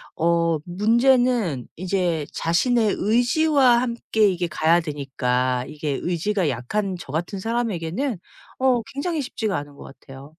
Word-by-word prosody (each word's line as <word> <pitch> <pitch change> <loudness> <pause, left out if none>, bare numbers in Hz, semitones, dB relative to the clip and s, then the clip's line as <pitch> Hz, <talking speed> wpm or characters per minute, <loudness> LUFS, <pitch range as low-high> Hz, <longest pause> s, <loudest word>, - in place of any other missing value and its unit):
어 170 0 +2
문제는 225 - +2
이제 175 -3 -1
자신의 220 +6 +1
의지와 245 +3 +3
함께 235 -3 +1
이게 180 -2 -1
가야 165 +1 +2
되니까 130 -5 -1
이게 150 -2 -3
의지가 180 0 0
약한 185 - -2
저 135 - -9
같은 175 +6 -3
사람에게는 225 - -2 0.4
어 255 -3 +3
굉장히 305 +2 -2
쉽지가 220 -6 -2
않은 145 0 -7
것 - - -12 0.2
같아요. 135 +3 -13
185 Hz, 285 characters per minute, -23 LUFS, 155-235 Hz, 0.4 s, 의지와